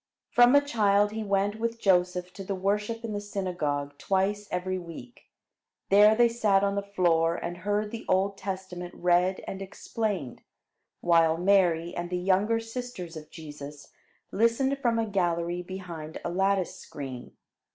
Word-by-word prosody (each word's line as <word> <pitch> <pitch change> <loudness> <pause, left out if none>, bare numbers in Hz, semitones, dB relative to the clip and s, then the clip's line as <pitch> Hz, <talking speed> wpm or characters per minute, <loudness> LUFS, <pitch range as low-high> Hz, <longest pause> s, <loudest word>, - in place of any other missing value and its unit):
From 245 +2 +6
a 285 - +7
child 205 -5 +3
he 220 0 -4
went 200 +1 0
with 230 0 -2
Joseph 180 -2 +1
to 195 - -8
the 195 +1 -3
worship 210 +4 -1
in 220 - -4
the 205 - -3
synagogue 175 -8 -3
twice 200 +2 0
every 185 +1 -2
week. 175 +9 -11 0.6
There 210 +2 +7
they 240 +1 +5
sat 210 -4 +2
on 200 0 +1
the 200 - -1
floor 170 -4 +1
and 175 +1 -5
heard 205 +3 -1
the 230 - -7
Old 195 +2 +2
Testament 185 -2 -6
read 180 +1 +2
and 195 - -5
explained, 195 - -4 0.6
while 165 -2 +4
Mary 175 -2 +2
and 175 0 -4
the 180 - -1
younger 195 +5 +2
sisters 225 -7 -7
of 155 -1 -9
Jesus 145 -2 -10 0.4
listened 250 +5 +2
from 235 -4 +1
a 225 - +1
gallery 175 -3 -1
behind 175 -4 -7
a 175 - -1
lattice 195 0 +1
screen. 130 -4 -8
190 Hz, 155 wpm, -28 LUFS, 175-210 Hz, 0.6 s, a